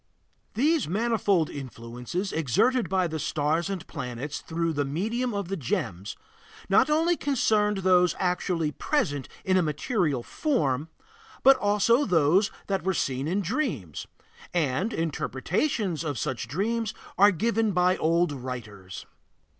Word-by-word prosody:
These 300 - +2
manifold 200 -3 +1
influences 125 - -5
exerted 190 - +2
by 190 -1 +2
the 160 -2 -3
stars 155 +5 0
and 190 -3 -4
planets 135 0 -5
through 165 0 -2
the 145 -1 0
medium 220 - -2
of 200 -4 -3
the 195 - -2
gems, 100 - -3 0.5
not 195 +8 +4
only 325 +3 +3
concerned 215 -8 +1
those 180 -1 +4
actually 180 -3 0
present 145 - -1 0.2
in 185 0 +3
a - - +4
material 155 - -1
form, 155 - -1 0.5
but 270 0 +8
also 210 +5 +3
those 180 +3 +3 0.2
that 195 -1 -1
were 190 -1 0
seen 135 -1 -1
in 190 +5 0
dreams, 180 - -3 0.5
and 170 - 0
interpretations 165 - -1
of 145 -5 -3
such 115 -1 -3
dreams 215 - -1 0.2
are 205 +1 +8
given 220 +3 +1
by 180 0 +3
old 170 +1 +2
writers. 115 -8 -7
180 Hz, 130 wpm, -27 LUFS, 145-210 Hz, 0.5 s, but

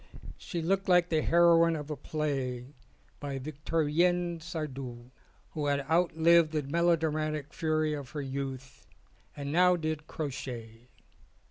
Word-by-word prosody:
She 170 -2 -4
looked 195 +3 0
like 180 -1 +5
the 160 -2 +2
heroine 170 0 +5
of 150 0 -6
a - - -2
play 135 -4 -3 0.5
by 140 -2 -4
Victorien 165 +4 0
Sardou 135 -7 -6 0.4
who 150 -2 -2
had 140 0 +1
outlived 165 +1 +3
the 150 -1 0
melo 170 +5 +3
dramatic 155 -2 -2
fury 155 -1 0
of 140 -3 -6
her 150 - -5
youth 135 -1 -6 0.5
and 140 0 -4
now 180 +3 +5
did 155 -2 -3
crochet. 120 -5 -6
155 Hz, 130 wpm, -30 LUFS, 140-165 Hz, 0.5 s, like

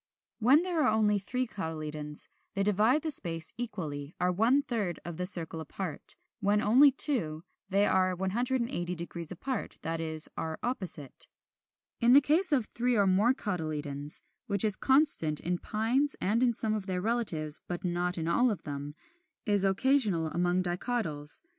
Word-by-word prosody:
When 265 +8 +4
there 355 -3 -1
are - - +3
only 215 -1 +2
three 250 +6 -2
cotyledons, 155 -7 -3 0.3
they 195 - 0
divide 215 +8 +2
the 315 - 0
space 165 - 0
equally, 165 -11 -6
are 180 0 +1
one 235 +10 +2
third 210 -10 -3
of 170 -2 -6
the 180 0 0
circle 165 -4 +3
apart. 160 +1 -6 0.2
When 205 0 +1
only 255 +7 +5
two 210 - +4 0.3
they 200 +1 +2
are 185 -1 +1
180° 190 - -3
apart, 245 +6 -5
that 165 +1 -3
is, 160 -1 -2
are 160 -1 -4
opposite. 185 - -4 0.7
39. 240 +1 +4
The 280 - +8
case 320 +5 +2
of 260 -6 +2
three 245 +2 -1
or 200 -2 +3
more 205 +7 +3
cotyledons, 155 - -3 0.2
which 200 -1 +2
is 210 -2 +5
constant 265 - +4
in 175 0 -2
Pines 245 +7 0
and 215 +5 0
in 240 -2 +2
some 220 -1 0
of 210 -2 -4
their 185 -1 -2
relatives 180 -9 -1
(but 175 -1 -5
not 180 0 -1
in 165 -1 -3
all 240 +9 +2
of 210 - -4
them), 145 0 -6 0.5
is 205 -3 +4
occasional 195 - +3
among 175 +3 0
Dicotyls. 175 -5 -3
195 Hz, 160 wpm, -29 LUFS, 165-240 Hz, 0.7 s, The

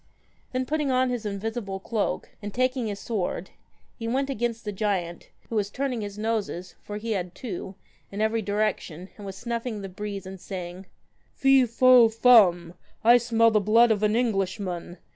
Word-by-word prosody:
Then, 255 0 -1
putting 300 +1 -1
on 255 0 +2
his 235 -3 -3
invisible 200 -1 -4
cloak, 215 +2 -2
and 205 0 -5
taking 255 0 0
his 205 -1 -4
sword, 190 -4 -3 0.5
he 230 - -4
went 270 +4 0
against 235 -2 -2
the 210 - -2
giant, 190 -4 -2 0.2
who 230 - -5
was 205 -2 0
turning 255 0 -2
his 205 -1 -6
noses 210 -5 -2
for 210 - -6
he 225 +2 -4
had 180 -4 -3
two 195 -4 -6 0.4
in 200 - -6
every 220 +1 +1
direction, 200 -4 -2
and 205 -2 -9
was 190 0 -7
snuffing 235 -2 -4
the 195 - -6
breeze 200 0 -6
and 190 -1 -9
saying 180 0 -7 0.2
* - - -41
Fee 270 -2 +5
fo 245 0 +6
fum, 205 -8 +5 0.3
I 235 +2 +8
smell 230 -1 +3
the 215 -1 +3
blood 225 +3 +5
of 210 -2 +1
an 210 0 +2
Englishman. 195 -6 -2
215 Hz, 180 wpm, -26 LUFS, 195-235 Hz, 0.5 s, I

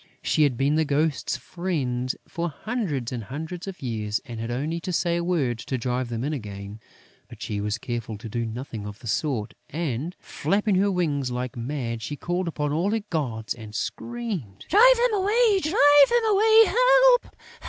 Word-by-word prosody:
She - - +1
had 140 -5 +3
been 140 +4 +2
the 160 - +3
Ghosts' 145 -3 0
friend 130 -5 -2 0.2
for 170 0 -3
hundreds 155 - -3
and 120 -4 -5
hundreds 160 - -6
of 190 -6 -7
years 110 -4 -2
and 115 -2 -7
had 115 +1 -4
only 150 +7 -2
to 185 +2 -4
say 170 0 +1
a 170 - -1
word 145 -10 0
to 130 - -3
drive 125 +1 -2
them 115 0 -3
in 150 +3 -1
again; 105 -4 -7 0.5
but - - -12
she 105 -1 -3
was 105 +2 -1
careful 115 -2 -5
to 110 - -9
do 115 +2 -2
nothing 115 -2 -6
of 105 0 -8
the 120 - -15
sort 115 -1 -1 0.2
and, 155 +1 -3
flapping 205 +1 0
her 195 +2 +3
wings 150 -8 0
like 125 +2 -4
mad, 120 -2 -3
she 145 - -4
called 175 +4 -2
upon 150 -3 -2
all 170 +6 +1
her 220 0 -1
gods 120 -9 -2
and 110 -2 -11
screamed: 205 - -4
"Drive - - +7
them 485 -1 +2
away! 420 +1 +3
Drive 290 -4 +6
them 475 -1 +2
away! 440 +2 +7
Help! - - +4
145 Hz, 185 wpm, -25 LUFS, 120-190 Hz, 0.5 s, Drive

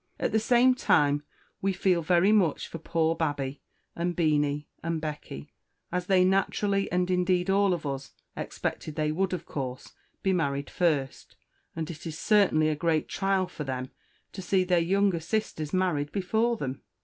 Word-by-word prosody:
At - - 0
the 220 - +3
same 245 +3 +4
time, 145 - +2 0.4
we 195 0 +1
Feel 180 -1 +2
very 175 +4 +3
much 190 -8 +2
for 165 - -7
poor 165 0 0
Babby, 145 -4 -2 0.3
and 175 +1 -1
Beenie, 150 -3 +1
and 165 -1 -2
Becky, 150 - -7 0.4
as 180 0 -2
they 185 -2 +4
Naturally, 195 +1 +1
and 180 0 +1
indeed 180 0 +2
all 200 0 +3
of 175 -4 -2
us, 135 -2 -4 0.2
Expected 155 - -4
they 155 -1 0
would, 190 +4 0
of 175 -2 -4
Course, 130 -2 -6 0.3
be 190 - +2
married 140 -5 -1
first; 150 -7 -1 0.4
and 160 0 -3
it 165 +1 -9
is 155 -1 -5
certainly 190 -8 +3
a 155 - 0
great 160 0 0
Trial 195 -1 +1
for 180 -4 -7
them 130 -1 -4 0.4
to 195 - -7
See 185 +1 +2
their 180 -1 +2
younger 190 +1 +2
sisters 165 -4 -2
married 175 -6 0
before 220 +5 0
them. 135 -7 -4
170 Hz, 170 wpm, -28 LUFS, 150-190 Hz, 0.4 s, same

